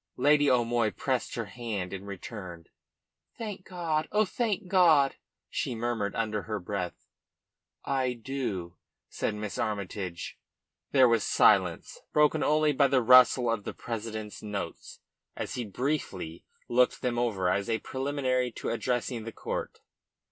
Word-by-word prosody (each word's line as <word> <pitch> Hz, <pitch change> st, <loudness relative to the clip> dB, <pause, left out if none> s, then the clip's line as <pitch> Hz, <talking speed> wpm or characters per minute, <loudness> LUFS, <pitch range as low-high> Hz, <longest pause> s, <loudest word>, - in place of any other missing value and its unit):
Lady 145 Hz, +2 st, +4 dB
O'Moy 120 Hz, -2 st, +2 dB
pressed 130 Hz, +3 st, -2 dB
her 115 Hz, -, -2 dB
hand 105 Hz, -5 st, -4 dB
in 95 Hz, +1 st, -6 dB
return. 95 Hz, -4 st, -8 dB, 0.7 s
"Thank 210 Hz, -5 st, -6 dB
God! 165 Hz, -4 st, -1 dB
Oh, 215 Hz, +1 st, +3 dB
thank 215 Hz, -1 st, -1 dB
God!" 165 Hz, -7 st, +5 dB, 0.3 s
she 120 Hz, -, -2 dB
murmured 115 Hz, -3 st, -2 dB
under 110 Hz, -2 st, -1 dB
her 105 Hz, 0 st, -4 dB
breath. 90 Hz, -1 st, -4 dB, 0.8 s
"I 130 Hz, -2 st, 0 dB
do," 115 Hz, -9 st, -4 dB, 0.3 s
said 105 Hz, -, -2 dB
Miss 105 Hz, -1 st, -5 dB
Armytage. 100 Hz, -4 st, -4 dB, 0.5 s
There 130 Hz, -2 st, +6 dB
was 115 Hz, -2 st, +3 dB
silence, -, -, +3 dB
broken 150 Hz, +1 st, +4 dB
only 155 Hz, 0 st, +3 dB
by 140 Hz, 0 st, +4 dB
the 130 Hz, -2 st, +2 dB
rustle 125 Hz, 0 st, +7 dB
of 115 Hz, -3 st, 0 dB
the -, -, -6 dB
president's 110 Hz, -2 st, -5 dB
notes 105 Hz, -2 st, -6 dB, 0.3 s
as -, -, -4 dB
he 120 Hz, -, -3 dB
briefly 100 Hz, -, -3 dB, 0.2 s
looked 125 Hz, +2 st, +2 dB
them 120 Hz, -2 st, 0 dB
over 105 Hz, -7 st, 0 dB
as 100 Hz, +4 st, 0 dB
a 115 Hz, -, +2 dB
preliminary 130 Hz, 0 st, -1 dB
to -, -, -4 dB
addressing 120 Hz, 0 st, -1 dB
the 115 Hz, -, -6 dB
court. -, -, -5 dB
120 Hz, 140 wpm, -29 LUFS, 105-135 Hz, 0.8 s, rustle